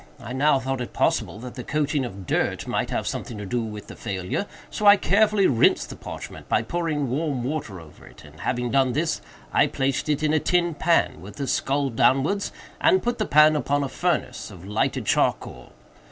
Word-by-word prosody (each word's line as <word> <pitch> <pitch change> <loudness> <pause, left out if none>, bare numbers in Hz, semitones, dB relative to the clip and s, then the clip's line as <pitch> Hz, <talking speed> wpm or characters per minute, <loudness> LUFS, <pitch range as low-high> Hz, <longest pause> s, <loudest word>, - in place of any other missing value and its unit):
I 120 - -7
now 140 +2 +3
thought 135 0 -3
it 120 - -6
possible - - 0
that 125 0 -7
the 125 - -7
coating 145 -1 0
of 100 -5 -8
dirt - - 0
might - - -1
have - - -2
something 115 - -4
to 105 - -6
do 120 +5 -1
with 105 -2 -6
the - - -10
failure; 95 - -3 0.2
so 210 - 0
I 205 0 +9
carefully 205 0 +3
rinsed 115 -8 +3
the - - -7
parchment - - -9
by - - +2
pouring 155 0 -1
warm 140 -3 -1
water 130 - -4
over 80 -2 -15
it, - - -15
and, 75 0 -15
having 125 -1 -2
done 135 -2 +3
this, 155 +3 -1 0.3
I - - +4
placed 135 +2 -1
it 150 0 0
in 155 0 +2
a 155 - +4
tin 175 +1 +1
pan, 160 - +1
with 100 +3 -10
the 140 - -3
skull 135 +1 0
downwards, 135 - +2 0.3
and 365 +4 +4
put 240 0 -1
the 215 - 0
pan 150 +1 +6
upon 145 -1 0
a 140 - -3
furnace 170 -8 -2
of 95 -3 -12
lighted 105 +2 -1
charcoal. - - 0
135 Hz, 205 wpm, -24 LUFS, 120-155 Hz, 0.3 s, I